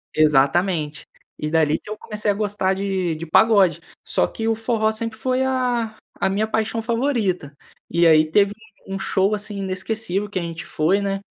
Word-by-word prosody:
Exatamente. 155 +2 +2 0.3
E 150 - -2
dali 155 -2 +2
que - - -14
eu 215 - -5
comecei 210 -1 -3
a - - +1
gostar 205 -2 0
de 190 -4 -1
de 160 +2 -6
pagode, 195 +1 +4 0.2
só - - +1
que 225 0 -4
o 225 - +2
forró 220 -1 0
sempre 220 0 -4
foi 255 +3 0
a 245 -4 0 0.2
a 195 - +1
minha 210 +3 0
paixão 220 +1 -1
favorita. 225 - -1 0.4
E 170 0 +2
aí 155 -1 +6
teve 200 +3 +3 0.3
um 195 0 -4
show, 195 +2 +1
assim, 210 -1 -4
inesquecível 195 +1 -2
que 195 - -5
a - - -3
gente 165 -1 -6
foi, 175 +6 +1
né, 195 -1 -1
200 Hz, 180 wpm, -22 LUFS, 175-220 Hz, 0.4 s, aí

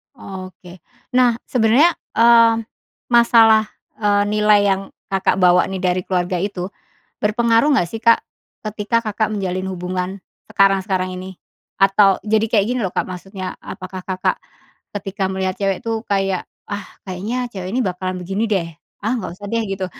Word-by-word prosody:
Oke. 185 -4 -10 0.4
Nah, 250 -2 +5 0.2
sebenarnya, 245 +7 +4 0.2
eee, 230 -1 +5 0.5
masalah, 230 -2 +6 0.3
eee, 205 -1 +2
nilai 210 -1 +4
yang 195 0 +1 0.3
Kakak 190 0 +1
bawa, 180 0 +5
nih, 190 - -3
dari 180 0 +1
keluarga 180 -1 -1
itu 195 -2 -3 0.6
berpengaruh 230 +6 +3
nggak, 175 - +2
sih, 225 - -6
Kak, 230 0 +5 0.4
ketika 215 +2 -1
Kakak 215 -1 -1
menjalin 185 -2 -2
hubungan 180 0 -3 0.4
sekarang-sekarang 190 -1 +2
ini? 185 0 -8 0.4
Atau, 195 0 +5
jadi 220 +1 +2
kayak 205 -4 +3
gini, 250 0 -1
loh, - - -1
Kak, - - 0
maksudnya, 185 +1 -6
apakah 185 -1 -8
Kakak 185 -1 -1 0.6
ketika 195 -1 -3
melihat 190 -1 -1
cewek, 195 -2 -1
tuh, 225 -1 -1
kayak, 195 -2 0 0.2
"Ah, 205 0 -3 0.2
kayaknya 205 +7 -3
cewek 185 -4 -6
ini 255 - +1
bakalan 185 0 -3
begini, 195 +5 -1
deh. 185 -5 0 0.4
Ah, 225 - +1
nggak 190 -6 -5
usah, 205 - -9
deh." 230 0 0
Gitu. 190 -1 -2
195 Hz, 150 wpm, -20 LUFS, 185-220 Hz, 0.6 s, masalah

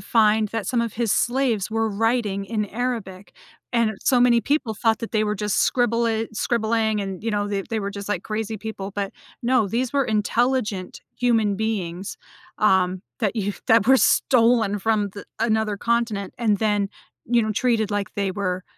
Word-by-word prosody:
find 215 +1 +3
that 220 -3 -4
some 245 -2 +1
of 230 -2 -3
his 230 -3 0
slaves 240 -5 +1
were 225 0 0
writing 210 -2 0
in 215 -1 -1
Arabic, 210 -5 -4 0.4
and 230 -2 +2
so 255 - +3
many 240 -1 +5
people 280 -5 0
thought 225 0 +1
that 230 - -5
they 215 -1 +2
were 210 0 -1
just 210 0 -1
scribbli 230 -2 +1
scribbling 220 -1 0
and, 195 -1 -5
you 230 - -1
know, 205 -1 -1
that 200 0 -3
they 225 -2 -1
were 200 0 -3
just, 200 0 -7
like, 195 -3 -1
crazy 220 0 -3
people, 205 -2 -6
but, 200 -1 -3 0.3
no, 240 -3 +3
these 245 +4 -1
were 275 -2 +2
intelligent 215 -2 0 0.2
human 225 -5 +2
beings, 195 -4 -3 0.4
um, 190 -2 +2 0.2
that 220 -1 -1
you 205 -1 -1
that 225 -1 +4
were 265 +1 +7
stolen 230 -6 +3
from 210 -1 0
th 205 - -10
another 220 -2 +1
continent, 230 -3 -1
and 215 -4 +2
then, 205 -2 +1 0.4
you 235 0 +3
know, 215 0 -1
treated 220 -2 +1
like 205 -1 -2
they 200 -3 -1
were 185 -1 -2
220 Hz, 180 wpm, -23 LUFS, 200-235 Hz, 0.4 s, were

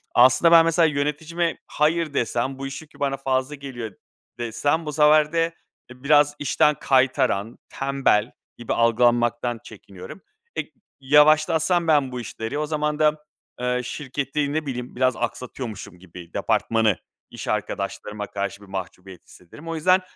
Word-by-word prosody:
aslında 130 +7 +6
ben 165 -1 +8
mesela 165 0 +3
yöneticime 155 +3 -1
“Hayır.” 155 0 0
desem, 130 +1 -1
“Bu 135 - -4
iş 135 +3 -7
yükü 155 - -18
bana 135 -1 -1
fazla 135 +1 -1
geliyor.” 130 -6 -7 0.5
desem, 145 +8 -1
bu 150 - -4
sefer 150 +1 +4
de, 165 0 +1 0.4
eee, 125 +1 -14
biraz 145 0 +4
işten 150 +1 +2
kaytaran, 130 -5 +1
tembel 135 -5 +1 0.3
gibi 120 - -3
algılanmaktan 120 0 +2
çekiniyorum. 95 - -12 0.3
Eee, - - -4 0.3
yavaşlatsam 155 +4 +4
ben 145 -4 +3
bu 125 -1 -4
işleri, 115 +3 -5
o 150 - -1
zaman 150 0 -2
da, 150 0 +2 0.4
eee, 125 0 0
şirketi, 140 +2 -3
ne 155 0 -1
bileyim, 125 -3 -5
biraz 130 -1 +2
aksatıyormuşum 120 -5 -6
gibi 90 -2 -13
Departmanı, 110 -5 +1 0.3
iş - - -9
arkadaşlarıma 105 0 -3
karşı 100 0 -4
bir 100 - -14
mahcubiyet 95 -1 -8
hissederim. 120 - -15
O 165 - -3
yüzden, 185 +4 +3
135 Hz, 145 wpm, -23 LUFS, 120-150 Hz, 0.5 s, ben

